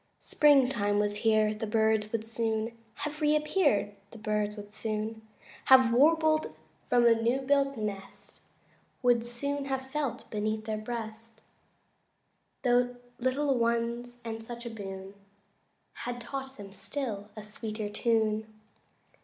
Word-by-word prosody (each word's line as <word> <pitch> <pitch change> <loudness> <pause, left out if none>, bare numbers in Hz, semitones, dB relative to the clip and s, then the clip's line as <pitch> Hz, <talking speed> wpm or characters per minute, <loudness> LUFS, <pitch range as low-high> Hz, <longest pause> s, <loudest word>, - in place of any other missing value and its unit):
Springtime 255 -8 +4
was 205 0 +1
here 215 -1 +3
the 215 +1 -4
birds 220 -1 +2
would 225 -1 -2
soon 225 0 -1 0.3
Have 300 0 -5
re 300 0 +4
appeared 300 - +2 0.2
the 230 - -12
birds 210 -1 -1
would 205 0 -9
soon 220 +1 -3 0.4
Have 260 -3 +7
warbled 310 +3 +3 0.3
from 240 -1 +4
a 235 - +7
new 230 +3 +1
built 275 0 +2
nest, 200 -3 -6 0.6
Would 240 -2 +4
soon 280 +4 -2
have 265 -1 -3
felt 290 -4 -2
beneath 215 0 -2
their 215 -1 -2
breast 225 0 -6 1.2
The 245 0 +2 0.2
little 265 +3 +1
ones 235 +1 -1
and 225 0 -5
such 235 +1 -7
a 235 - -4
boon 195 -2 -7 0.8
Had 245 0 -5
taught 270 +2 -6
them 200 -2 -10
still 215 -6 -5
a 215 - -7
sweeter 215 0 -5
tune. 220 0 +1
230 Hz, 130 wpm, -30 LUFS, 215-260 Hz, 1.2 s, Have